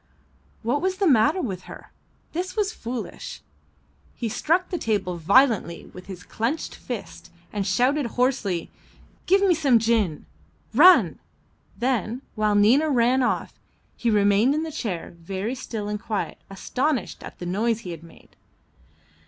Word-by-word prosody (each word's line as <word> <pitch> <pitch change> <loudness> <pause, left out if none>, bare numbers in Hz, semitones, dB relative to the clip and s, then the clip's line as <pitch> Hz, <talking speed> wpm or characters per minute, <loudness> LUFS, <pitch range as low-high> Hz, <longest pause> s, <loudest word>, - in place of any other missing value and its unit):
What 245 +6 0
was 375 +1 0
the 395 - +1
matter 300 +5 +4
with 190 -7 -4
her? - - -11 0.4
This 360 +3 -3
was 420 -1 0
foolish. 235 0 -6 0.7
He 235 - -3
struck 330 - +1
the 355 - -2
table 205 -5 -1
violently 200 - +2
with 180 0 -11
his 180 -3 -8
clenched 240 - -3
fist - - -8 0.2
and 205 -2 -2
shouted 250 +7 +2
hoarsely, 235 -9 0 0.6
"Give 390 +2 +4
me 380 -3 +5
some 285 -7 +4
gin! 220 -8 +1 0.5
Run!" 355 +10 +6 0.6
Then, 245 0 -1
while 215 -1 +1
Nina 245 +10 +4
ran 250 0 +3
off, 250 - -1 0.4
he 235 - -1
remained 205 +5 +3
in 310 - 0
the 320 - -5
chair, 205 - -4
very 195 +7 -4
still 225 -5 -5
and 210 0 -3
quiet, 220 -3 -3
astonished 250 +5 -2
at - - -10
the 175 - -7
noise 220 +5 0
he 180 - -7
had 165 -2 -8
made. 165 -1 -18
230 Hz, 145 wpm, -24 LUFS, 200-285 Hz, 0.7 s, Run